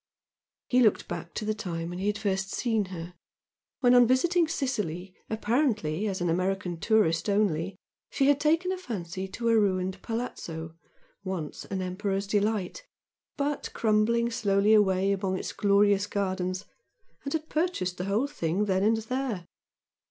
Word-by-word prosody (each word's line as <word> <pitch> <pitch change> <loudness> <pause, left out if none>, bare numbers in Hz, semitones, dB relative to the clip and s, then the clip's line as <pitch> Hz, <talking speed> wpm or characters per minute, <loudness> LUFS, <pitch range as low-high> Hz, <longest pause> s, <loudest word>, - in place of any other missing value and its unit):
He 250 - +3
looked 220 -5 +3
back 170 - -6
to 215 - -3
the 215 - +1
time 170 -5 -4
he 185 +3 -3
had 210 0 +1
first 195 -2 -1
seen 225 -1 0
her, 175 -1 -7 0.7
when 245 -1 +5
on 245 -1 +7
visiting 335 +7 +3
Sicily 210 - -2 0.2
apparently 215 - 0
as 190 -3 -3
an 175 - +1
American 180 0 -1
tourist 210 -4 +2
only, 195 -3 +1 0.3
she 275 - +1
had 285 0 +4
taken 330 +5 +2
a 375 - -3
fancy 190 - -5
to 230 +5 -2
a 225 -1 +5
ruined 185 -2 0
"palazzo" 170 -9 -5 0.5
once 185 -6 -5
an 190 -1 -3
emperor's 195 +2 -2
delight, 210 - -1 0.5
but 290 0 -1
crumbling 235 +2 +2
slowly 205 -1 +3
away 195 -2 +4
among 190 -1 -1
its - - -5
glorious 200 0 +3
gardens, 185 -2 -2 0.6
and 280 - -4
had 315 -1 -2
purchased 310 - -1
the 180 - -2
whole 205 +7 +1
thing 205 - -1
then 190 -2 +1
and 220 +2 +3
there. 225 -4 -3
205 Hz, 150 wpm, -28 LUFS, 185-235 Hz, 0.7 s, on